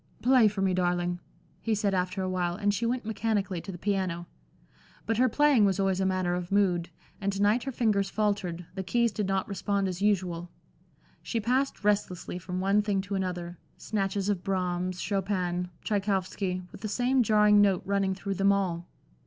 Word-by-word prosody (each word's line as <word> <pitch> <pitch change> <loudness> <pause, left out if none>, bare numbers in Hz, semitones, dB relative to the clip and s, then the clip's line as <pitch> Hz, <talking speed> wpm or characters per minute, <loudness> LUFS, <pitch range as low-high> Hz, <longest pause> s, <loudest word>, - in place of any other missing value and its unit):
"Play 250 -2 +6
for 200 -2 -1
me, 190 -1 +2
darling," 175 -1 0 0.4
he 225 -1 0
said, 205 -1 0
after 185 +1 -1
awhile, 180 -2 -1
and 205 0 +1
she 230 +3 -1
went 245 -1 -1
mechanically 205 -4 -1
to 195 - -7
the 175 - -8
piano. 185 -3 -1 0.8
But 225 0 0
her 255 +1 +4
playing 290 -2 +4
was 200 -1 +2
always 195 -1 +1
a 190 - +2
matter 185 -2 0
of 180 0 -4
mood, 180 -4 +2 0.3
and 200 0 0
to 195 - -4
night 210 +4 +3
her 270 - -2
fingers 210 -5 +1
faltered, 200 -5 -1
the 190 - -4
keys 235 +5 +1
did 210 -2 -2
not 195 0 0
respond 200 0 -1
as 185 0 -4
usual. 180 -4 0 0.7
She 230 - -2
passed 255 +3 0
restlessly 200 -4 0
from 180 0 -4
one 195 +2 +3
thing 205 -2 0
to 200 +1 -7
another 180 -3 -3 0.2
snatches 195 -2 -2
of 200 -4 -1
Brahms, 185 -2 -1
Chopin, 185 -3 -1
Tschaikowski, 195 -2 -1
with - - -12
the 220 - -3
same 250 +4 +2
jarring 210 -2 +5
note 195 -3 +3
running 195 -1 0
through 195 +1 -3
them 195 +1 +3
all. 180 -3 -1
195 Hz, 185 wpm, -28 LUFS, 180-210 Hz, 0.8 s, Play